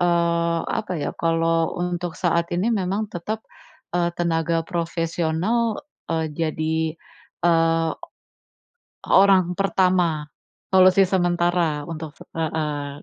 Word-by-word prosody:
eee, 170 -1 +2
apa 215 -4 -2
ya, - - -2
kalau 165 0 +1
untuk 175 -1 -3
saat 170 -1 +2
ini, 185 +6 +1
memang 205 0 -1
tetap, 215 +6 -4 0.5
eee, 175 -1 +2
tenaga 165 -1 0
profesional, 170 - -1 0.3
eee, 160 -1 0
jadi, 160 0 -1 0.5
eee, 165 -1 +3 1.2
o - - -3
orang 190 -2 +5
pertama, 180 -5 +1 0.5
solusi 185 +1 +6
sementara 175 -4 +1
untuk 160 -2 -6 0.2
heeh, 150 -3 -3
170 Hz, 100 wpm, -23 LUFS, 165-180 Hz, 1.2 s, solusi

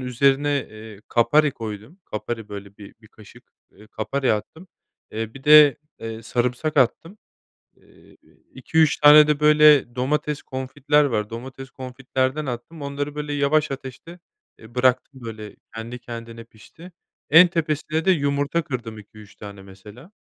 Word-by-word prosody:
üzerine, 140 +3 +1
eee, 110 -1 -12
kapari 145 +6 +3
koydum. 110 - -9
Kapari, 110 +1 -6
böyle, 100 0 -10
bir 100 -1 -13
bir 110 - -19
kaşık, 105 -2 -18 0.3
eee, 105 +2 -19
kapari 130 +4 -2
attım. 160 - -6 0.4
Eee, 110 +1 -5
bir 135 - -13
de, 150 -3 +7 0.2
eee, 115 0 -7
sarımsak 125 +7 -2
attım. 165 - 0 0.6
Eee, - - -23 0.4
2-3 155 +4 +1
tane 150 +1 +8
de, 150 -1 0
böyle, 150 -4 +5
domates 150 +3 -2
confit'ler 145 +3 0
var 105 -5 -2
domates 130 +3 -9
confit'lerden 130 +2 -3
attım. 130 +6 -7
Onları, 145 +1 -5
böyle, 150 0 -5
yavaş 145 +1 +1
ateşte, 135 +6 -9 0.4
eee, 115 +2 -16
bıraktım, 130 +1 0
böyle, 110 -2 -9 0.2
kendi 115 +2 -7
kendine 115 -1 -9
pişti. 160 - -16 0.4
En 170 +3 +8
tepesine 155 -1 -2
de 190 - +3
yumurta 145 0 0
kırdım 115 -6 -6
2-3 105 0 -15
tane 100 -1 -11
mesela. 105 - -15
130 Hz, 140 wpm, -22 LUFS, 115-150 Hz, 0.6 s, tane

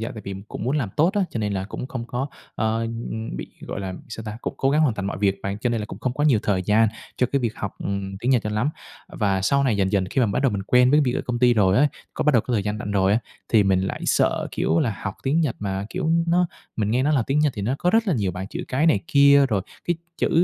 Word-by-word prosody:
dạ 115 - -3
tại 110 - -8
vì 100 - -5
cũng - - -6
muốn 130 +5 0
làm 130 -8 -1
tốt 165 +4 +4
á, 205 - +2
cho - - -4
nên 105 -1 -1
là 95 -1 -2
cũng 105 +5 -6
không 130 -3 -5
có, 125 +3 -2 0.3
ờ, 110 0 0
ừm, 115 - -4
bị - - -5
gọi - - -6
là 95 -1 -4
sao 115 -1 -6
ta? 105 -1 -5
Cũng - - -4
cố 135 - +1
gắng 150 +2 +3
hoàn 145 -8 +3
thành 100 -2 -3
mọi 100 - -3
việc 100 -1 +2
mà, 100 - -2
cho 120 - 0
nên 115 -2 -1
là 105 - -4
cũng - - -9
không 125 - -1
có 145 - 0
nhiều 135 -7 +5
thời 95 -3 +1
gian 110 +3 +4 0.3
cho 125 - +2
cái 140 - +2
việc 115 -3 -2
học, 100 - -4
ừm, 95 -1 -3
tiếng 120 +5 0
Nhật 125 -4 +3
cho 105 - -3
lắm. 105 +7 0 0.4
Ờ, - - -13
và 95 -2 +1
sau 140 +7 +2
này 120 -6 +2
dần 95 0 +1
dần 100 -2 +2
khi - - +1
mà 120 - +4
bắt 100 - -1
đầu 135 - +3
mình 100 -1 -2
quen 125 +4 +4
với 150 +2 +5
việc 125 -4 +1
ở - - 0
công 125 -1 -1
ty 120 0 +4
rồi 100 -3 +3
á, 145 - +5 0.3
có - - -2
bắt 150 - +4
đầu 120 - +5
có 125 - -4
thời 105 - +1
gian 105 +1 -2
rảnh 105 - -5
rồi 100 -1 +3
á, 110 - +3 0.3
thì 110 -3 +5
mình 95 -1 +2
lại 95 - -3
sợ, - - +2
kiểu, 80 - +1
là 110 0 0
học 100 - -3
tiếng 145 +5 +2
Nhật 150 -8 0
mà 100 0 -3
kiểu 175 -3 -1 0.2
nó 175 +1 +3 0.3
mình 105 -2 0
nghe 125 +3 +2
nói 150 +2 +2
là 135 - +3
tiếng 140 +2 +1
Nhật 150 -2 +3
thì 100 - -3
nó 125 +6 0
có 180 - +2
rất 225 +1 +3
là 180 - +2
nhiều 100 -7 0
bảng 90 +2 -5
chữ - - -5
cái 140 +6 +1
này 160 - +4
kia. 140 -2 +6
Rồi 100 -4 0 0.2
cái 175 - 0 0.2
chữ - - +2
115 Hz, 315 wpm, -23 LUFS, 100-135 Hz, 0.4 s, kia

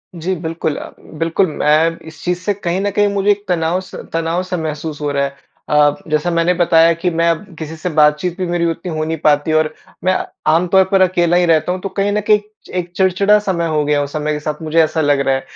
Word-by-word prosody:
जी 170 +3 -2
बिल्कुल 165 -2 -3
अ, - - -7
बिल्कुल, 165 +4 -1
मैं 155 +2 +2
इस 160 -1 -12
चीज़ 180 0 -1
से 205 +3 -1
कहीं 185 -2 -2
न 205 - 0
कहीं 205 0 +2
मुझे 200 0 0
एक 205 0 -1
तनाव 175 0 0
स 190 - -12 0.2
तनाव-सा 170 +3 -1
महसूस 155 -1 -4
हो 145 -1 -1
रहा 140 0 0
है। 140 0 -6 0.3
अ, 150 -1 +4 0.2
जैसा 155 +3 +1
मैंने 170 +1 +2
बताया 165 -1 +4
कि 170 +2 -1
मैं 170 0 +1
अब 165 +4 -1
किसी 160 0 -6
से 160 +3 -4
बातचीत 150 +4 +2
भी 185 - -2
मेरी 175 0 0
उतनी 165 +2 -6
हो 155 - -1
नहीं 160 +1 -2
पाती 145 +1 +3
और 155 0 +1 0.3
मैं 185 0 +2 0.4
आमतौर 180 +3 +4
पर 195 -1 +4
अकेला 175 -2 +3
ही 180 - +3
रहता 165 0 +2
हूँ 185 - -2
तो 195 - -4
कहीं 200 +1 -1
न 210 +1 0
कहीं 210 -1 +5 0.4
एक 175 -1 -6
चिड़चिड़ा-सा 195 +2 +2
मैं 170 -1 -1
हो 155 -2 0
गया 145 -1 +1
समय 150 +1 -3
के 150 - -3
साथ 150 +1 -5
मुझे 160 +1 0
ऐसा 160 +1 -1
लग 145 -2 +2
रहा 135 - +3
है। 135 - -2
165 Hz, 235 wpm, -17 LUFS, 155-180 Hz, 0.4 s, कहीं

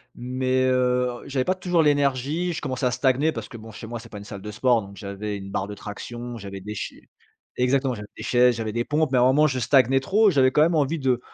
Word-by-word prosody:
mais 130 +1 0
heu, 125 0 +2 0.2
j'avais 130 -2 -1
pas 185 - +1
toujours 180 -2 +1
l'énergie, 145 +4 +1
je - - -5
commençais 130 -2 -2
à 125 - +2
stagner 130 +4 +2
parce - - -6
que 120 - -9
bon 110 0 -11
chez 110 - -9
moi 120 0 -5
c'est - - -13
pas 105 - -8
une - - -10
salle 100 -1 -9
de 105 - -7
sport, 120 +1 +2
donc 100 0 -12
j'avais 100 +2 -5
une 95 0 -8
barre 95 0 -2
de 105 - -6
traction, 120 +4 -7
j'avais 100 -2 -8
des 105 +2 -7
chai - - -7 0.5
exactement, 130 +1 +1
j'avais 105 -3 -8
des - - -7
chaises, 125 0 +4
j'avais 110 -1 -3
des 120 +2 -1
pompes, 150 +2 0
mais 130 - +3
à - - +4
un - - +5
moment 140 +4 +4
je 130 -3 -2
stagnais 135 +2 +4
trop, 205 +8 +3
j'avais 130 -3 +4
quand 150 - +3
même 165 +2 +4
envie 155 +1 +1
de 130 -3 +1
125 Hz, 260 wpm, -24 LUFS, 110-140 Hz, 0.5 s, un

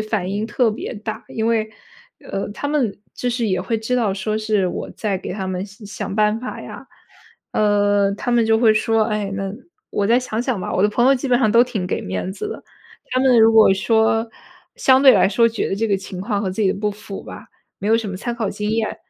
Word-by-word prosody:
反 215 -4 -2
应 210 +2 -2
特 240 0 +1
别 215 +3 -6
大。 215 0 -6
因 220 0 -2
为 225 -1 +1 0.5
呃， 195 +1 -4
他 285 - -4
们 265 -10 0 0.2
就 250 - -2
是 240 -1 -1
也 185 -3 0
会 225 +5 -1
知 220 +3 -2
道 220 -6 +1
说 215 +2 -2
是 215 -3 +1
我 - - -5
在 200 -4 -2
给 - - -6
他 190 0 -4
们 185 0 -3
想 205 +1 -13
想 200 -2 -5
办 210 +1 +2
法 255 - -6
呀， - - -10 0.7
呃， 205 -1 +2
他 245 +4 -4
们 235 -1 +3
就 225 0 +4
会 225 -2 +5
说， 225 +1 +2
哎， 210 -3 -2
那 195 -1 -3 0.4
我 200 - 0
再 235 +3 +4
想 235 -3 -3
想 250 -5 -1
吧， - - -4
我 185 - +2
的 210 - +4
朋 240 +3 +1
友 275 - +6
基 265 +1 -3
本 245 - +4
上 220 -5 +2
都 235 +2 +6
挺 220 -8 -3
给 - - -2
面 95 - -4
子 420 - -5
的。 - - -7 0.5
他 255 - +1
们 260 -2 +5
如 225 0 +6
果 220 -3 +7
说 225 +2 +2 0.5
相 260 0 +4
对 270 -2 +9
来 - - +4
说 230 +3 +3
觉 225 - -2
得 - - -1
这 225 +3 -1
个 200 - +1
情 190 -1 -8
况 205 0 -1
和 195 -2 -2
自 200 +4 -2
己 195 - +3
的 - - -7
不 210 0 0
符 210 -1 -9
吧， - - -10 0.3
没 200 - -3
有 225 +1 +4
什 220 - -4
么 190 - -5
参 240 +4 -4
考 225 -4 -2
经 210 +1 -3
验， 225 0 -1
215 Hz, 265 characters per minute, -20 LUFS, 200-230 Hz, 0.7 s, 对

